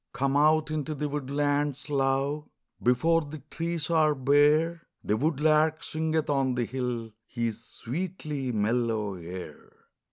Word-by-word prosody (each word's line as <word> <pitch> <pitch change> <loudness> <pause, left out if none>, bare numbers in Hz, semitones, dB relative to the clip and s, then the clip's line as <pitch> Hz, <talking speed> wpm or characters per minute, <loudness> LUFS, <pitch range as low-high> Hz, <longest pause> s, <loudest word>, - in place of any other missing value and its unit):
COME 135 +1 0
out 155 +1 +4
into 155 0 -2
the 150 +1 -2
woodlands, 145 0 -1
love, 140 +1 0 0.3
Before 160 +8 +3
the 155 0 -7
trees 170 -1 -2
are 155 -2 +4
bare; 150 +5 +3 0.2
The 105 - +1
woodlark 155 +3 +2
singeth 160 0 -1
on 135 -3 +1
the 120 -1 0
hill 120 -2 -3 0.2
His 115 -2 -3
sweetly 150 0 -4
mellow 110 -1 0
air. 90 0 -9
145 Hz, 125 wpm, -28 LUFS, 125-155 Hz, 0.3 s, out